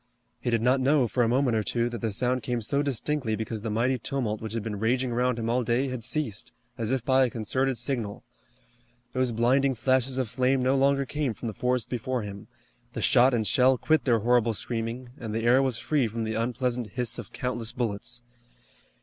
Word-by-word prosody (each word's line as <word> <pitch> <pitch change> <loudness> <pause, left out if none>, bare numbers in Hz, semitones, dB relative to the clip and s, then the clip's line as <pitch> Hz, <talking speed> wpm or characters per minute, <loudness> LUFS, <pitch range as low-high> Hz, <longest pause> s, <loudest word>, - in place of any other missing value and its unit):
He - - -2
did 115 -1 +1
not 130 +2 +4
know, 135 -1 +3
for 125 - 0
a 115 - +4
moment 125 -1 +2
or 110 - +2
two, 120 +3 0
that 120 -3 -6
the 115 - -1
sound 125 +4 0
came 120 -1 -2
so 140 +6 +1
distinctly 140 -3 -1
because 110 0 -4
the 115 - -3
mighty 120 +4 +1
tumult 115 -5 -2
which 110 -1 -5
had 115 -2 -2
been 105 -2 -4
raging 125 +3 +1
around 125 0 +1
him 115 -1 -3
all 120 +2 +1
day 120 +4 +1
had 125 -2 -5
ceased, 115 -6 -2 0.2
as 115 -2 -3
if 130 -3 -1
by 130 0 +4
a 125 - +2
concerted 125 +4 -1
signal. 120 -4 -2 0.9
Those 130 -1 +1
blinding 130 +4 +2
flashes 130 +2 +1
of 130 -3 0
flame 130 +3 +1
no 130 +2 +2
longer 140 0 +3
came 140 -3 -2
from 115 - -5
the - - -6
forest 125 +2 0
before 125 0 -2
him, 100 -1 -8 0.5
the - - -4
shot 130 -1 +5
and 110 -2 0
shell 130 +2 +4
quit 155 +3 +1
their 115 -4 +3
horrible 120 -1 +3
screaming, 120 +3 -4
and 110 -3 -5
the 115 - -1
air 125 +3 +5
was 130 -4 0
free 145 -3 +1
from 115 +1 -4
the 110 0 -2
unpleasant 120 +1 -1
hiss 125 -1 -1
of 115 - -8
countless 120 -3 -3
bullets. 120 0 -3
120 Hz, 215 wpm, -27 LUFS, 115-130 Hz, 0.9 s, shot